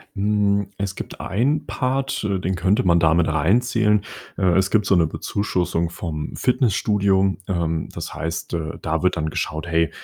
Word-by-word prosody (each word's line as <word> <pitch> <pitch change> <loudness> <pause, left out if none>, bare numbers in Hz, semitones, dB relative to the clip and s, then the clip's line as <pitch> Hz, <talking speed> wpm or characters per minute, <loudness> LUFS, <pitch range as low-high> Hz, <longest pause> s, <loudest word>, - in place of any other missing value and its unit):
Hm, 100 0 +1
es 100 -2 -3
gibt - - -7
einen 135 +9 0
Part, 130 -2 -1
äh, 100 -3 0
den 95 +1 -1
könnte 95 +4 +2
man 85 -2 +4
da 80 -1 +4
mit 85 -1 +2
reinzählen. 105 +6 +2 0.4
Äh, - - -3
es 95 0 +2
gibt 105 -1 +2
so 100 - +3
'ne 80 - +3
Bezuschussung 90 -1 -1
vom 80 -3 -5
Fitnessstudio. 100 -6 +2
Ähm, 85 -4 -1
das - - -6
heißt, 80 +1 -4
äh, 80 -1 -3
da 80 +3 -1
wird 90 - +2
dann 80 -2 -1
geschaut, 80 +2 -3
hey, 80 -1 +2
95 Hz, 175 wpm, -22 LUFS, 85-105 Hz, 0.4 s, man